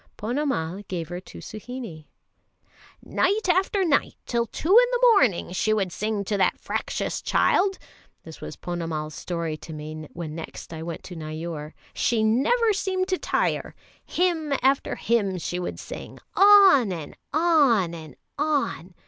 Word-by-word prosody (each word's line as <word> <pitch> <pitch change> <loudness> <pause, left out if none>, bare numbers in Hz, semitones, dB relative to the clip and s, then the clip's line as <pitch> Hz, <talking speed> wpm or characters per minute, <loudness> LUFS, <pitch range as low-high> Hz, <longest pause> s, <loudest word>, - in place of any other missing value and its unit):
Ponnamal 210 - -2
gave 170 -4 -4
her 175 0 -4
to 185 - -13
Suhinie. 215 -8 -8 1.0
"Night 405 +2 +1
after 380 +2 +2
night 290 -4 +1
till 235 -1 0
two 315 - -5
in - - +7
the - - +4
morning 250 - +2
she 215 +4 +1
would 195 -4 -1
sing 210 +2 -2
to 205 +1 -1
that 185 - +2
fractious - - -3
child" 390 +1 +2 0.5
this - - -11
was - - -7
Ponnamal's 165 -3 -4
story 170 -2 -3
to 160 - -10
me 155 0 -7
when 165 -3 -6
next 165 +1 -8
I 160 - -6
went 165 0 -6
to 180 - -9
Neyoor. 155 -1 -6 0.2
"She 225 -2 +1
never 360 - +3
seemed 375 -1 -1
to 370 - 0
tire; - - -1 0.3
hymn 330 -5 0
after 270 +1 +2
hymn 205 -5 0
she 175 +1 -3
would 180 - -4
sing, - - -8 0.2
on 390 - +7
and 165 -4 -6 0.2
on 280 - +3
and 155 -5 -9 0.2
on. 280 - -1
215 Hz, 150 wpm, -25 LUFS, -, 1.0 s, in